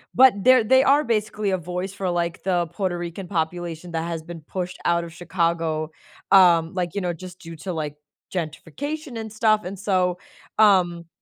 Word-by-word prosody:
but 260 -1 +8
they're 255 -2 +6
they 260 +4 +5
are 285 +3 +4
basically 215 -2 -1
a 190 - +1
voice 180 +3 -4
for, 195 -2 -2
like, 170 0 -2
the 175 -3 +1
Puerto 175 +1 -2
Rican 175 +2 -6
population 170 -1 -3
that 165 0 -2
has 165 -2 -4
been 170 0 -8
pushed 180 +3 -5
out 170 0 +2
of 170 - -8
Chicago, 165 -3 -1 0.4
um, 170 -4 +6
like, 180 -2 -2
you 200 - -1
know, 175 -1 -1
just, 180 +2 -10
due 165 -1 -9
to, 185 +2 -5
like, 150 -2 -4 0.4
gentrification 235 - -5
and 220 -1 -6
stuff, 215 -1 +3
and 190 +1 -5
so, 185 -2 +1 0.4
um 175 -5 +4
180 Hz, 180 wpm, -23 LUFS, 170-200 Hz, 0.4 s, but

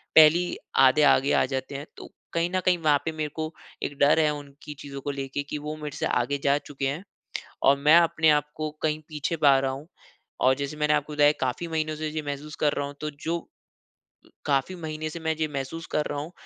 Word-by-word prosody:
पहली 160 +3 +6 0.3
आधे 130 +4 +5
आगे 140 -1 +4
आ - - +4
जाते 130 +1 -4
हैं। 140 +2 -5
तो - - -10 0.2
कहीं 170 +1 +1
न - - +3
कहीं 180 -1 +4
वहाँ 150 -2 +5
पे 165 - 0
मेरे 155 -1 -3
को 155 0 -4 0.3
एक 145 - -4
डर 145 +3 +5
है 155 -1 +4
उनकी 145 0 -9
चीज़ो 140 -1 -7
को 145 - -3
लेके 135 0 -4
कि - - -3
वो 150 +1 -5
मेरे 150 -1 -5
से - - -1
आगे 125 +4 0
जा 140 0 +4
चुके 145 -1 -5
है। 145 +7 -3 0.6
और 140 - +6
मैं 150 +3 +6
अपने 160 -2 +4
आप 150 0 +2
को 155 0 -2
कहीं 155 -1 +1
पीछे 155 +1 -2
पा 140 -1 +7
रहा 135 0 0
हूँ। 135 +3 -7 0.6
और 130 +1 +5
जैसे 140 +2 -4
मैंने 150 0 +2
आपको 150 0 -1
बताया 145 0 +5
काफ़ी 130 +6 -1
महीनों 155 -1 -1
से 155 0 -3
ये 155 0 -3
महसूस 145 +2 -5
कर 145 - +4
रहा 145 - -2
हूँ 145 - -8
तो 150 - -3
जो 165 +2 -2 1.0
काफ़ी 140 +5 +1
महीने 155 -2 -4
से 170 - -7
मैं 160 0 -1
जो 155 0 -1
महसूस 140 +4 -5
कर 150 - +2
रहा 145 - -3
हूँ 155 +4 -5
150 Hz, 230 wpm, -26 LUFS, 140-155 Hz, 1.0 s, पा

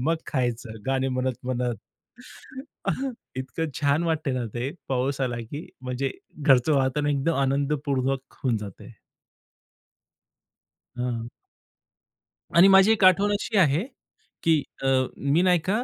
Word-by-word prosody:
मग 160 +6 +1
खायचं, 120 -4 -2
गाणे 135 0 +1
म्हणत 130 -1 -1
म्हणत. 125 -1 -1 1.6
इतकं 150 +5 -3
छान 145 +2 +2
वाटतंय 160 -4 0
ना 125 -1 -2
ते. 120 +3 -2 0.2
पाऊस 135 +1 -1
आला 125 -2 -1
की 145 +3 -6 0.2
म्हणजे 130 +1 -2 0.3
घरचं 140 -1 +4
वातावरण 140 +2 +1
एकदम 145 +4 +1
आनंदपूर्वक 135 -1 -1
होऊन 125 -4 +1
जातंय. 100 -3 -10 2.1
हां. 120 -2 -3 1.3
आणि 180 +3 +9
माझी 195 +2 +7
एक 220 -3 +2
आठवण 195 +3 +5
अशी 205 +1 -1
आहे 160 -2 +4 0.6
की 160 -2 +4 0.2
अ, - - +1 0.3
मी 140 +5 +2
नाही 180 -1 +4
का, 205 +9 -1
135 Hz, 120 wpm, -25 LUFS, 130-160 Hz, 2.1 s, आणि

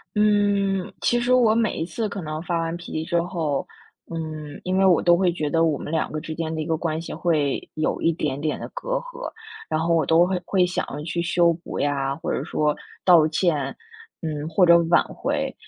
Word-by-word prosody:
嗯， 205 -2 +2
其 240 - +2
实 245 +1 +1
我 230 -4 +5
每 225 -2 +1
一 160 - -1
次 215 +6 -3
可 200 -2 -5
能 155 0 -4
发 170 -1 -1
完 165 0 -2
脾 175 - -10
气 155 - -2
之 170 0 +1
后， 165 -5 -2 0.4
嗯， 155 -3 -6
因 185 +1 0
为 195 - +4
我 180 -3 +5
都 175 0 +5
会 180 0 +2
觉 155 -3 -2
得 165 +2 +3
我 155 -4 +1
们 - - -6
两 160 - 0
个 155 - -4
之 160 0 -6
间 160 -1 -3
的 160 - -3
一 - - -6
个 160 - +1
关 160 -1 -2
系 165 - -7
会 150 -5 0
有 155 - -1
一 165 - +3
点 145 -3 -2
点 155 0 -1
的 - - -6
隔 - - -6
阂， - - -6 0.4
然 155 - 0
后 170 +1 +2
我 160 - +3
都 165 +2 +5
会 185 -1 -1
会 185 -1 +3
想 180 - -2
要 145 - -6
去 170 +2 -2
修 170 -1 +3
补 165 +1 -7
呀， 140 -1 0
或 160 - -3
者 - - -1
说 150 -1 0 0.3
道 170 -4 +6
歉， 155 -4 0 0.5
嗯， 155 -2 -3
或 175 +3 +3
者 170 0 +8
挽 170 - +5
回。 - - -2
165 Hz, 245 characters per minute, -23 LUFS, 155-185 Hz, 0.5 s, 者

